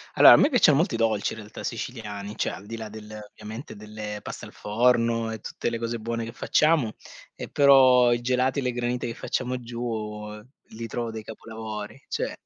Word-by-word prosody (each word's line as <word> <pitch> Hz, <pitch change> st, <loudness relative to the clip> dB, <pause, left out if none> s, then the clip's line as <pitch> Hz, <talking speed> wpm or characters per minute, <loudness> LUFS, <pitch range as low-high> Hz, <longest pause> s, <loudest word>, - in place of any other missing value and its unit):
Allora, -, -, +10 dB
a -, -, +8 dB
me 290 Hz, -, +5 dB
piacciono 185 Hz, -, +5 dB
molto 165 Hz, -6 st, +1 dB
i -, -, 0 dB
dolci 110 Hz, -3 st, +1 dB
in 110 Hz, -, -9 dB
realtà 105 Hz, 0 st, -9 dB
siciliani, 105 Hz, -4 st, -5 dB
cioè -, -, -1 dB
al 100 Hz, +2 st, -10 dB
di 115 Hz, 0 st, -6 dB
là 110 Hz, -1 st, -6 dB
del 110 Hz, 0 st, -9 dB
ovviamente 110 Hz, +4 st, -9 dB
delle 105 Hz, 0 st, -7 dB
pasta -, -, -7 dB
al -, -, -13 dB
forno, 115 Hz, +1 st, +1 dB
e 110 Hz, -, -5 dB
tutte 120 Hz, -, -4 dB
le 115 Hz, -, -3 dB
cose 115 Hz, 0 st, -2 dB
buone 115 Hz, +1 st, -3 dB
che 115 Hz, -, -6 dB
facciamo, 155 Hz, -8 st, +2 dB, 0.4 s
e -, -, -8 dB
però 130 Hz, -3 st, +6 dB
i 120 Hz, -, -1 dB
gelati 130 Hz, +2 st, +1 dB
e -, -, -1 dB
le 125 Hz, -1 st, -1 dB
granite 120 Hz, 0 st, -2 dB
che 115 Hz, -, -5 dB
facciamo 125 Hz, 0 st, -2 dB
giù, 115 Hz, -3 st, -4 dB, 0.5 s
li 115 Hz, +1 st, -7 dB
trovo 115 Hz, +1 st, -3 dB
dei 110 Hz, -1 st, -6 dB
capolavori, 110 Hz, +1 st, -7 dB
cioè. -, -, -2 dB
115 Hz, 200 wpm, -26 LUFS, 110-125 Hz, 0.5 s, Allora